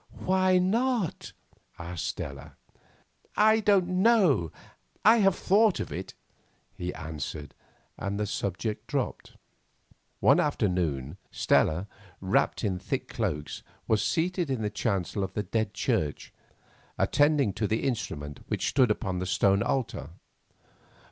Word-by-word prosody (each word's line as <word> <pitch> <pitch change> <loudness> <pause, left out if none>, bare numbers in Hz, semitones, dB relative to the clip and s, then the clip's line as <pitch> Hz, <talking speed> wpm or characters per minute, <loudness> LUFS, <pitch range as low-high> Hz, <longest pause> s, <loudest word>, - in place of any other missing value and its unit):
"Why 185 0 +3
not?" 220 - 0 0.5
asked 85 0 -5
Stella. 70 0 -6 0.8
"I 220 +1 +5
don't 200 -4 +3
know, 185 - +4 0.5
I 220 +2 +8
have 195 -4 +4
thought 205 +1 +3
of - - -4
it," - - -6 0.6
he 90 0 -4
answered, 75 -2 -6 0.5
and 100 +1 -3
the 105 - 0
subject 105 +2 -3
dropped. 140 -3 -3 0.9
One - - +5
afternoon 80 -6 -1
Stella, 90 +6 +2 0.3
wrapped 95 +4 +1
in 95 -4 -1
thick - - -3
cloaks, 75 0 -3 0.3
was 110 -2 +2
seated 175 -1 0
in 130 -5 -1
the 105 - -1
chancel 100 -2 -1
of 95 0 -4
the 105 - -2
Dead 110 -2 -1
Church 75 -2 -1 0.6
attending 145 -7 +3
to 105 - -1
the 110 +2 -1
instrument 75 - -3
which - - -1
stood 130 -4 +3
upon 95 -3 -1
the 90 - -3
stone 100 +1 +3
altar. 130 -4 -2
105 Hz, 125 wpm, -28 LUFS, -, 0.9 s, I